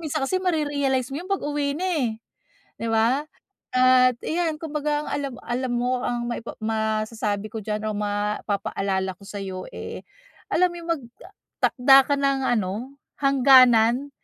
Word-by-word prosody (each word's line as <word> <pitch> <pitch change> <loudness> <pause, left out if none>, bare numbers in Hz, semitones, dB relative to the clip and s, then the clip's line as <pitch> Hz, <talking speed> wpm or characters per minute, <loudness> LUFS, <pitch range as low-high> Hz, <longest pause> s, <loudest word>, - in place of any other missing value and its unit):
minsan 310 -1 -3
kasi 370 - 0
mare-realize 290 -7 0
mo - - -3
'yon 365 - -10
pag-uwi 290 -6 -1
na 365 +4 -2
eh, 310 -10 +1 0.7
di 230 - -3
ba? 230 +6 +2 0.5
At 255 -1 +5
iyan 325 -2 -1
kumbaga 300 -1 -2
ang - - -6
alam 280 -2 -3
alam 245 +1 -2
mo 245 +1 0
ang 240 -1 -2
maipa 235 -1 -6
masasabi 215 -1 -1
ko 225 - -3
diyan 215 +1 -3
o 215 - -2
mapapa-alala 205 -2 -2
ko - - -17
sayo 190 -2 -6
eh, - - -7 0.5
alam 365 +1 +3
mo - - -9
yung 335 - -10
mag-takda 270 - +1
ka 285 - +2
ng 275 -1 +1
ano, 230 +5 -2 0.2
hangganan 260 -2 +5
255 Hz, 150 wpm, -24 LUFS, 220-290 Hz, 0.7 s, At